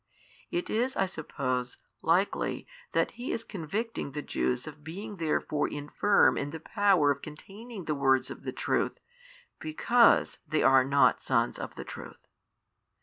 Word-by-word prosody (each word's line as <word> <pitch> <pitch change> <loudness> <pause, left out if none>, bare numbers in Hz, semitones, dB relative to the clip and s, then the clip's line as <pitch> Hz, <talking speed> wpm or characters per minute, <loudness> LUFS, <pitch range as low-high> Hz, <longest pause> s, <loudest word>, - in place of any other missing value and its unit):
It 350 0 -2
is 245 +4 0
(I 195 - +3
suppose) 130 -8 -3 0.2
likely 180 +5 +1 0.3
that - - +2
He 245 - -5
is 230 - -2
convicting 205 - -4
the 150 0 -4
Jews 125 0 -1
of 150 -1 -10
being 195 +6 -7
therefore 155 -2 0
infirm 150 +8 +2
in 140 - -3
the 160 +2 -7
power 190 -5 +3
of 140 0 -3
containing 195 +6 -9
the 155 - 0
words 135 -2 +2
of - - -8
the - - -4
truth, - - -1 0.6
because 235 +10 +3
they 155 - +1
are 135 -1 +6
not 140 +2 +3
sons - - +1
of - - -6
the - - -7
truth. - - -10
160 Hz, 150 wpm, -29 LUFS, 145-205 Hz, 0.6 s, are